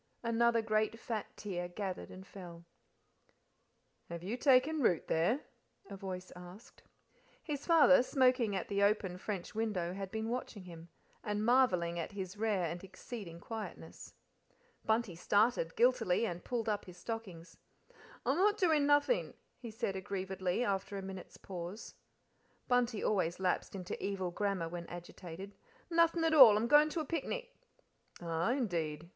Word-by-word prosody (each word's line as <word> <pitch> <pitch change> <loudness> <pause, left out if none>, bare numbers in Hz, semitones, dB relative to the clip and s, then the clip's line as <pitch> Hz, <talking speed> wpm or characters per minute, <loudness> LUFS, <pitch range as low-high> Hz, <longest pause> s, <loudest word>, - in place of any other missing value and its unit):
Another 230 0 +2
great 215 +1 0
fat 225 -3 -3
tear 175 -4 -4
gathered 185 0 -5
and 185 +1 -11
fell. 175 -4 -11 1.4
"Have 170 0 -6
you 205 +6 -2
taken 275 +4 +4
root 180 -9 +2
there?" 195 - +2 0.5
a - - -5
voice 185 -1 -6
asked. 180 +5 -13 0.6
His 290 -3 -5
father, 320 -6 +7
smoking 255 -5 +2
at 190 - -3
the 200 0 -1
open 200 -3 +1
french 195 -3 -5
window, 205 -6 -1
had 195 0 -5
been 220 +2 -3
watching 235 -4 -4
him, 170 -1 -11 0.3
and 210 0 -1
marvelling 180 -9 +3
at 170 - -5
his 190 -1 -5
rare 210 -4 0
and 170 +2 -5
exceeding 195 -2 -8
quietness. 220 +4 -8 0.7
Bunty 220 -3 +1
started, 205 0 +1
guiltily, 235 -4 +3
and 175 -4 -4
pulled 235 -3 -2
up 210 -2 -1
his 180 -1 -12
stockings. 185 -4 -7 0.7
"I'm 270 +5 +2
not 410 +3 +3
doin' 315 -7 +3
nothin'," 290 +12 +2 0.2
he 235 - -7
said 215 -3 -3
aggrievedly, 190 +1 -2
after 200 -2 -2
a 195 - -5
minute's 190 -1 -8
pause. 180 +3 -7 0.7
Bunty 245 -3 +1
always 180 -5 0
lapsed 185 +1 -1
into 185 -2 -6
evil 190 -3 -2
grammar 195 -2 -1
when 170 0 -6
agitated. 175 +2 -9 0.4
"Nothing 335 0 +3
at 325 -1 +2
all. 250 -9 +9
I'm 220 - +1
goin' 295 +3 +6
to 320 +1 -2
a - - -4
picnic." - - -4 0.6
"Ah, 170 +1 -1
indeed!" 170 - -2
205 Hz, 150 wpm, -34 LUFS, 180-240 Hz, 1.4 s, all